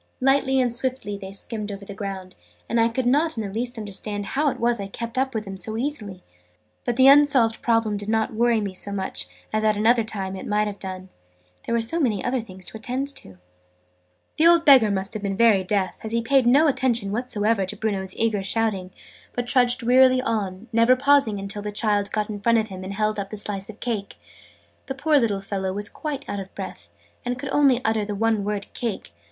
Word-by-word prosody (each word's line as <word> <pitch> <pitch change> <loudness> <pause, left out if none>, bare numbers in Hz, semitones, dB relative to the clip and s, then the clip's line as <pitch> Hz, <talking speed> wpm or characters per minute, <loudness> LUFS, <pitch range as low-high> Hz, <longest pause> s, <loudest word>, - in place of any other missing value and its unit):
Lightly 270 0 +2
and 245 -2 +1
swiftly 245 -4 -3
they 195 -1 -8
skimmed 210 +1 -2
over 200 0 -8
the 200 - -8
ground, 190 -2 -6 0.3
and 230 0 +1
I 230 - +3
could 245 +2 -2
not 295 +4 +2
in 220 - -1
the 195 - -6
least 245 +2 -3
understand 205 -1 -5
how 290 +7 +1
it - - -5
was 235 -1 +1
I 200 - -4
kept 230 +4 -6
up 265 -1 0
with 215 -1 -2
them 195 -1 -7
so 215 +4 -4
easily. 220 -9 -4 0.6
But 245 - 0
the 260 +2 +5
unsolved 275 -5 +5
problem 225 -3 +1
did 205 +1 -6
not 220 0 0
worry 230 0 +2
me 200 -2 -4
so 200 +2 -4
much 190 - -3 0.3
as 215 0 0
at 215 -1 +2
another 230 +2 +3
time 195 -3 -4
it 190 - -7
might 210 0 +1
have 205 -1 -5
done, 185 -1 -7 0.6
there 235 - 0
were 230 - +2
so 325 +10 +2
many 225 - 0
other 250 0 0
things 185 -4 -10
to 220 - -5
attend 255 +5 -3
to. 95 -1 -11 1.0
The 320 - +5
old 340 -1 +5
Beggar 260 -7 +7
must 195 +1 -2
have 215 - -5
been 195 -1 -3
very 220 -4 +4
deaf, 190 0 -1
as 220 - -4
he 230 0 +1
paid 265 0 +3
no 280 +6 +5
attention 255 -7 +1
whatever 220 -3 0
to - - -5
Bruno's 195 -3 -2
eager 220 -3 0
shouting, 195 -2 -1 0.4
but 245 - -2
trudged 245 -1 +3
wearily 255 +1 +5
on, 210 -4 -3
never 230 +3 +5
pausing 275 -5 +3
until 200 +1 -3
the 210 0 -4
child 205 -1 0
got 215 -1 -1
in 205 -2 -6
front 230 +2 +3
of 220 -1 0
him 185 -1 -8
and 195 +1 -6
held 215 0 0
up 195 -1 -4
the 215 - -6
slice 200 -1 -4
of 220 - -10
cake. 220 -5 -3 0.7
The 270 - -4
poor 295 +2 +3
little 210 -5 0
fellow 195 -1 -3
was 205 +2 -3
quite 285 +3 -5
out 205 - -3
of 195 0 -8
breath, 185 - -8 0.3
and 245 0 -2
could 275 +1 -6
only 270 -4 +3
utter 220 -1 +1
the 205 0 -4
one 220 0 +1
word 205 0 -3
"Cake!" 225 - -4
220 Hz, 225 wpm, -23 LUFS, 200-245 Hz, 1.0 s, Beggar